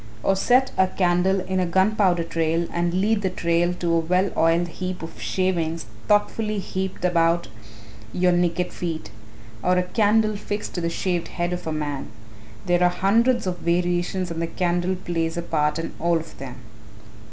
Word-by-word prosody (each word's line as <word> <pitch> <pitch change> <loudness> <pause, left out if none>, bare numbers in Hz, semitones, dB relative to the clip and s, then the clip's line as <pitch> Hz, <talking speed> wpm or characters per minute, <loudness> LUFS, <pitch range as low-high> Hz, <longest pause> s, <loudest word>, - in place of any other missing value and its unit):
Or 195 - +3
set 250 +7 +3
a 190 - +5
candle 185 +1 +1
in 185 0 -2
a 185 - +2
gunpowder 190 -1 +2
trail 165 0 0
and 170 0 0
lead 205 +4 +1
the 190 - 0
trail 170 -1 +1
to 170 -1 -1
a 165 - +4
well 180 +4 +1
oiled 165 +2 +3
heap 185 0 -5
of 165 - -9
shavings 170 -4 -1 0.2
thoughtfully 210 +1 +1
heaped 190 -1 -3
about 170 -1 +2 0.6
your 180 +5 +2
naked 175 0 0
feet. 160 -11 -4 0.5
Or 180 +6 +2
a 180 - +3
candle 215 +2 +2
fixed 205 0 -4
to 175 - -3
the 170 - 0
shaved 175 0 -1
head 175 0 -2
of 180 -2 -5
a - - -1
man 145 -3 -3 0.6
there 175 0 +2
are 180 - +5
hundreds 225 +7 +2
of 180 -1 -2
variations 175 +1 0
and 165 0 -3
the 165 - -1
candle 175 +2 0
plays 165 -2 -2
a 170 - -2
part 150 -2 0
in 165 0 -4
all 170 0 +2
of 165 0 -8
them. 130 -2 -7
175 Hz, 175 wpm, -23 LUFS, 170-190 Hz, 0.6 s, a